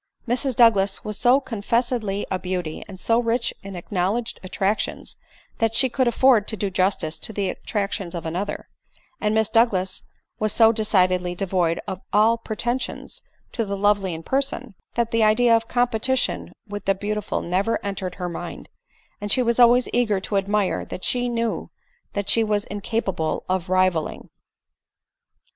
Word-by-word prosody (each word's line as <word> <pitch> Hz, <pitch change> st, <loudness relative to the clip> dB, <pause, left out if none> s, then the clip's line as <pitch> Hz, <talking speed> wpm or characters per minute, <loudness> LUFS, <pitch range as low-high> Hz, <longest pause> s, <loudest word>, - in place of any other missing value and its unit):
Mrs 250 Hz, +2 st, 0 dB
Douglas 205 Hz, -5 st, +4 dB
was 210 Hz, -, -3 dB
so 250 Hz, +2 st, +5 dB
confessedly 230 Hz, -3 st, -1 dB
a 185 Hz, -, 0 dB
beauty, 180 Hz, -3 st, -4 dB
so 230 Hz, +5 st, +1 dB
rich 235 Hz, 0 st, 0 dB
in 195 Hz, -1 st, -8 dB
acknowledged 195 Hz, +6 st, -2 dB
attractions, 195 Hz, +2 st, -2 dB, 0.4 s
that 225 Hz, 0 st, +1 dB
she 260 Hz, +3 st, +4 dB
could 260 Hz, -1 st, +1 dB
afford 240 Hz, -3 st, +4 dB
to 220 Hz, -, -3 dB
do 200 Hz, 0 st, -2 dB
justice 185 Hz, -4 st, 0 dB
to -, -, -2 dB
the 200 Hz, -2 st, -1 dB
attractions 200 Hz, -4 st, -3 dB
of 170 Hz, -, -5 dB
another; 180 Hz, +5 st, -4 dB, 0.5 s
and 215 Hz, 0 st, 0 dB
Miss 220 Hz, -1 st, +2 dB
Douglas 195 Hz, -5 st, +3 dB, 0.4 s
was 215 Hz, -1 st, +1 dB
so 225 Hz, -1 st, +6 dB
decidedly 185 Hz, -5 st, +1 dB
devoid 175 Hz, -3 st, 0 dB
of 185 Hz, -, -5 dB
all 225 Hz, +3 st, +4 dB
preten 240 Hz, +3 st, -2 dB
sions -, -, -6 dB, 0.3 s
to 230 Hz, -, -1 dB
the 200 Hz, -2 st, -3 dB
lovely 200 Hz, -3 st, +2 dB
in 160 Hz, -, -8 dB
person, 265 Hz, -1 st, -1 dB, 0.2 s
that 235 Hz, -1 st, 0 dB
the 230 Hz, -, +2 dB
idea 230 Hz, +2 st, +5 dB
of 225 Hz, 0 st, 0 dB
competition 245 Hz, +2 st, +1 dB, 0.2 s
with 205 Hz, 0 st, -6 dB
the 195 Hz, -, +2 dB
beautiful 210 Hz, +1 st, -3 dB
never 195 Hz, +6 st, 0 dB
entered 190 Hz, -2 st, -4 dB
her 180 Hz, -2 st, -4 dB
mind, 170 Hz, -, -7 dB, 0.5 s
and 205 Hz, 0 st, -3 dB
she 255 Hz, -, +4 dB
was 235 Hz, 0 st, +1 dB
always 245 Hz, +1 st, +6 dB
eager 225 Hz, -5 st, +2 dB
to 200 Hz, -, -1 dB
admire 200 Hz, 0 st, 0 dB
what 185 Hz, -, -8 dB
she 245 Hz, -1 st, +1 dB
knew 230 Hz, -1 st, -2 dB, 0.4 s
that 200 Hz, -1 st, -3 dB
she 230 Hz, -, +5 dB
was 210 Hz, -1 st, 0 dB
in 205 Hz, 0 st, -6 dB
capable 190 Hz, -8 st, -2 dB
of 185 Hz, -1 st, -1 dB
rivalling. 185 Hz, -4 st, 0 dB
210 Hz, 160 wpm, -23 LUFS, 190-230 Hz, 0.5 s, so